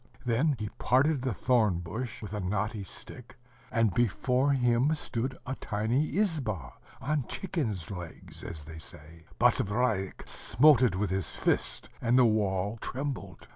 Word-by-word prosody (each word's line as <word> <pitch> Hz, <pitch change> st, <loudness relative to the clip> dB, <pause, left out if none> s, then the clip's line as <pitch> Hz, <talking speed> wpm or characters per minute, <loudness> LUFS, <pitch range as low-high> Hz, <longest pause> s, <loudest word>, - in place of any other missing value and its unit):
Then 130 Hz, +5 st, +2 dB
he 105 Hz, -1 st, -4 dB
parted 135 Hz, +3 st, +3 dB
the 130 Hz, 0 st, 0 dB
thorn 110 Hz, -6 st, +2 dB
bush 110 Hz, +9 st, -5 dB
with 105 Hz, 0 st, -6 dB
a 105 Hz, -, -2 dB
knotty 100 Hz, +3 st, -1 dB
stick, 120 Hz, +5 st, -10 dB, 0.4 s
and 115 Hz, -5 st, +2 dB
before 125 Hz, +5 st, +2 dB
him 125 Hz, +3 st, +3 dB
stood 130 Hz, -2 st, -3 dB
a 130 Hz, -, -2 dB
tiny 115 Hz, +6 st, -1 dB
izba, 120 Hz, -, 0 dB, 0.3 s
on 145 Hz, 0 st, -1 dB
chicken's 115 Hz, -, -3 dB
legs, 90 Hz, -4 st, -8 dB
as 80 Hz, -3 st, -6 dB
they 80 Hz, +2 st, -9 dB
say. 80 Hz, +1 st, -9 dB
Basavriuk 105 Hz, -3 st, +1 dB
smote 130 Hz, +3 st, +4 dB
it 120 Hz, -8 st, +3 dB
with 95 Hz, -1 st, -1 dB
his 95 Hz, -4 st, -1 dB
fist, -, -, -1 dB
and 120 Hz, +1 st, +3 dB
the 130 Hz, -, +7 dB
wall 105 Hz, -1 st, +1 dB
trembled. 130 Hz, -9 st, -5 dB
115 Hz, 145 wpm, -30 LUFS, 95-130 Hz, 0.4 s, the